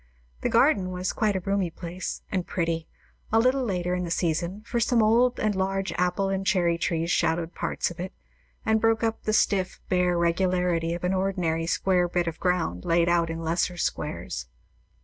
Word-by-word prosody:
The - - 0
garden 185 -2 +3
was 180 0 -2
quite 215 -3 +1
a - - +1
roomy 195 -1 0
place, 175 +2 -6
and 185 -2 -1
pretty, 165 -2 -1 0.4
a 225 - +4
little 255 +3 +3
later 180 -5 -1
in 180 0 -1
the 175 - -4
season; 170 +4 -1
for 235 - -1
some 235 0 +3
old 240 +3 +3
and 215 -1 +1
large 195 0 -1
apple 180 +2 +1
and 195 0 -1
cherry 175 -4 +2
trees 170 0 0
shadowed 165 0 +1
parts - - -2
of 170 - -11
it, 185 +1 -4 0.5
and 220 0 +2
broke 225 +1 +2
up 225 0 0
the 215 - +1
stiff, 190 -3 +1
bare 180 -1 +2
regularity 170 -1 +1
of 175 - -8
an 180 +1 +1
ordinary 180 -4 0
square 180 0 +2
bit 175 0 0
of 165 -1 -4
ground 175 - 0
laid 170 0 +2
out 170 -1 +2
in 165 0 -4
lesser 170 +2 0
squares. 65 - -3
180 Hz, 190 wpm, -26 LUFS, 170-195 Hz, 0.5 s, a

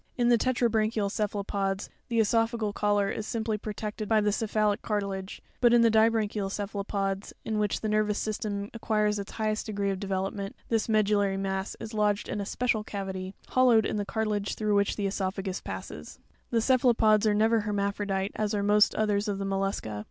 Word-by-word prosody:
In 240 -1 +3
the 240 - +6
tetra 250 -1 +2
branchial 215 -2 0
cephalopods, 200 -2 -2 0.2
the 235 - -2
cesophageal 225 -1 +1
collar 205 -1 +1
is 215 - -4
simply 220 -2 -2
protected 210 0 -5
by 220 -1 +4
the 210 0 +2
cephalic 210 -1 0
car 210 -2 0
tilage; 195 -1 -5 0.2
but 240 -1 +5
in 235 - +6
the 230 - +5
dibranchial 220 -2 +2
cephalopods, 200 -1 -3
in 215 -1 -1
which 210 -2 0
the 220 - -2
nervous 210 0 +1
system 205 -1 -3
acquires 210 -2 0
its 200 - -7
highest 215 0 -1
degree 200 -2 -1
of 190 - -3
develop 195 -1 -2
ment, 200 -1 -5
this 225 -1 0
medullary 205 -2 +2
mass 190 0 -2
is 225 - -7
lodged 210 -1 +1
in 205 - -2
a 200 - -5
special 230 -3 0
cavity, 190 -2 -5
hollowed 245 -4 +4
in - - -1
the 205 - 0
cartilage 210 -1 -2
through 215 -1 0
which 200 0 +2
the 205 - -2
cesopha 195 0 -2
gus 190 -1 -4
passes.; - - -7
13. - - -32 0.3
The 230 -2 +1
cephalopods 230 -4 +4
are 210 - +3
never 225 +2 +3
hermaphrodite, 200 -1 -1
as 215 0 -1
are 200 - 0
most 210 +1 +4
others 210 -1 +1
of 205 -1 -1
the 195 - -3
mollusca. 195 - -2
210 Hz, 195 wpm, -28 LUFS, 200-220 Hz, 0.3 s, the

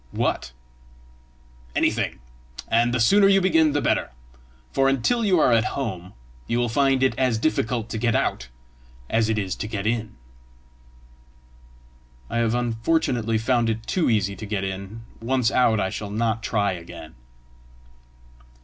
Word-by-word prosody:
"What?" - - -1 1.2
"Anything; - - 0 0.5
and 120 +1 +2
the 125 - 0
sooner 195 - +5
you 195 0 +5
begin 160 -5 +3
the 145 - 0
better! - - +1 0.6
for 135 0 +2
until 135 - +1
you 190 -5 +3
are 125 - +4
at 115 -1 +4
home, 95 -9 -4 0.3
you 120 - 0
will 120 -1 0
find 135 +2 +2
it 130 - +3
as 130 -4 +2
difficult 120 -3 -1
to 110 - -4
get 115 0 +1
out - - -1 0.6
as 110 -1 +2
it 110 - 0
is 95 -3 -2
to - - -4
get 105 -2 -4
in." 110 -1 -2 2.2
"I - - -1
have, 115 0 +1
unfortunately, 120 -1 0
found 120 0 +1
it 110 0 -3
too 180 -7 0
easy 100 -3 +1
to 110 - -7
get 100 -2 -2
in; 95 +4 -6 0.2
once 125 -1 +1
out 115 -4 +3
I 95 -1 -1
shall 105 - -5
not 110 +2 -1
try 105 -3 0
again!" 85 -2 -9
115 Hz, 150 wpm, -23 LUFS, 110-130 Hz, 2.2 s, sooner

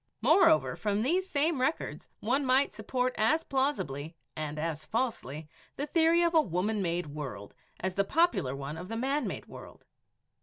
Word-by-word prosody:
Moreover, 335 -5 +4
from 210 0 -1
these 365 +8 +1
same 295 -2 +1
records 265 +5 -2
one 260 +6 +1
might 265 +1 +3
support 250 +4 -1
as 310 +9 +3
plausibly 175 - -2 0.2
and 155 -1 -4
as 155 0 -3
falsely 160 - -3 0.3
the 285 - -2
theory 330 +2 +3
of 340 0 +2
a 320 - +6
Woman 205 - -1
made 175 -1 -1
World 140 -9 -7 0.3
as 185 0 -2
the 200 - +2
popular 275 - +1
one 140 +3 -6
of 180 +3 -8
a 225 - -3
Man 275 +5 0
made - - -5
World. - - -12
225 Hz, 165 wpm, -30 LUFS, -, 0.3 s, a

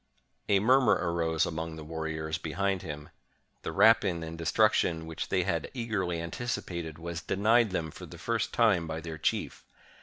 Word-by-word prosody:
A 100 -1 +5
murmur 130 +5 +5
arose 85 -2 0
among 80 0 -4
the 80 - -8
warriors 80 0 -3
behind 95 +4 -1
him. 75 -1 -7 0.5
The - - -4
rapine 100 -7 +4
and 80 0 -6
destruction 85 -1 +2
which 80 0 -5
they - - +2
had - - -1
eagerly 105 -8 -1
antici 85 +9 -3
pated 85 -3 -5
was 85 +1 -5
denied 110 +5 +3
them 80 -4 -2
for - - -10
the - - -11
first 115 -2 -1
time 105 -8 +3
by 80 0 -3
their 80 -1 -7
chief. - - -1
85 Hz, 170 wpm, -29 LUFS, 80-105 Hz, 0.5 s, A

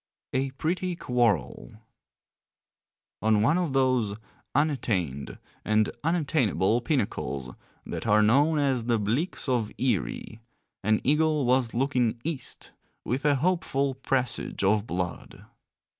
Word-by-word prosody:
A 135 +1 0
PRETTY 175 +6 -2
QUARREL 110 - 0 1.5
On 110 -1 +3
one 160 +10 +3
of 170 -7 -1
those 130 -6 +2 0.4
unattained, 95 - -1 0.3
and 110 0 +2
unattainable 130 - +1
pinnacles 100 - -2 0.3
that - - -5
are 105 +1 +5
known 145 +9 +4
as 135 -5 +1
the 120 -1 +2
Bleaks 115 - -2
of 120 -5 0
Eerie, 115 - -2 0.4
an 110 +1 +2
eagle 150 0 +2
was 125 -2 +2
looking 125 -3 +1
East 160 -4 -5 0.3
with 130 +6 -2
a 145 -1 +4
hopeful 140 -3 0
presage 130 -4 -1
of 105 +2 +2
blood. 90 -1 -5
125 Hz, 115 wpm, -27 LUFS, 105-145 Hz, 1.5 s, are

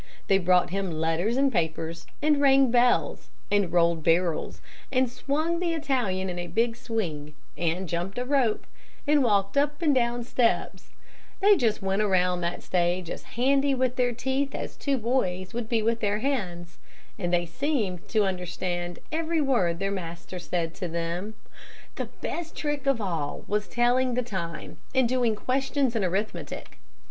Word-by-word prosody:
They 195 -1 +4
brought 180 -1 +3
him 195 0 -1
letters 165 +8 0
and 275 0 +3
papers, 165 -1 -2 0.2
and 300 -1 +3
rang 270 -2 +5
bells, 245 0 +2 0.2
and 205 -4 +2
rolled 170 -2 +3
barrels, 170 0 +1 0.3
and 260 -1 +3
swung 310 +7 -1
the 345 -2 0
Italian 245 -12 0
in 175 -1 -4
a 175 - -4
big 230 +4 +1
swing, 175 - -4 0.2
and 175 +2 -1
jumped 175 +5 -3
a 250 - -1
rope, 255 -5 +1 0.4
and 295 -1 +4
walked 200 0 +2
up 290 +1 +2
and 310 -4 +3
down 240 -1 +1
steps 235 0 0 0.5
they 410 +1 +6
just 225 - 0
went 195 +2 +1
around 180 -3 +2
that 170 +1 -3
stage 175 -1 0
as - - -5 0.2
handy 275 +2 +3
with 255 -1 0
their 245 -1 +2
teeth 265 +3 -1
as - - -5
two 280 -2 0
boys 210 -6 -1
would 235 -1 -4
be 225 -2 +1
with 230 +1 +1
their 205 -1 +1
hands, 185 -9 -3 0.4
and 175 -3 -1
they 175 0 +2
seemed 210 - -2
to 215 -2 +2
understand 175 -1 -3
every 325 +1 0
word 235 - +2
their 195 +2 -1
master 175 -1 -6
said 170 -2 -2
to 180 - -4
them. 170 +5 -3 0.6
"The - - -1 0.2
best 335 -1 -4
trick 295 -2 -2
of 275 -4 +3
all 170 -8 -3
was 210 0 0
telling 245 +1 +2
the 250 - +1
time 180 -7 -5 0.2
and 260 -2 +4
doing 240 -3 +1
questions 265 +2 0
in 220 - +1
arithmetic. 180 -4 -3
215 Hz, 165 wpm, -27 LUFS, 175-260 Hz, 0.6 s, they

